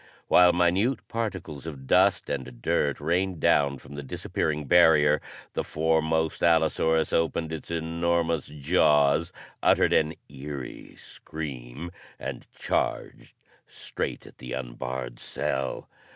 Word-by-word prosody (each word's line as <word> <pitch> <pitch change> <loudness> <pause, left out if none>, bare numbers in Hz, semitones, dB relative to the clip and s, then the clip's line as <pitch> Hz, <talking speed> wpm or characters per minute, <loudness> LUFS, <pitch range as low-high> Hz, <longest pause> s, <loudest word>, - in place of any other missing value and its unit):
While 90 0 +7
minute 90 +8 +1
particles 95 -10 -4
of 70 -4 -8
dust - - +3
and 65 -3 -5
dirt 70 +3 0
rained 90 +3 0
down 70 -2 +3
from 70 - -13
the 70 - -5
disappearing 75 +2 -3
barrier, 75 -2 +5 0.3
the - - -1
foremost 80 0 0
allosaurus 80 -1 +2
opened 80 -1 0
its 80 - -7
enormous 85 -1 0
jaws, 75 +1 +2 0.3
uttered - - +4
an 80 +1 +2
eery 70 -1 -8
scream 70 0 -8 0.3
and - - -7
charged - - -3 0.3
straight - - -5
at - - -16
the 65 -1 -7
unbarred 60 -1 -5
cell. 65 0 -3
80 Hz, 115 wpm, -26 LUFS, 70-85 Hz, 0.3 s, While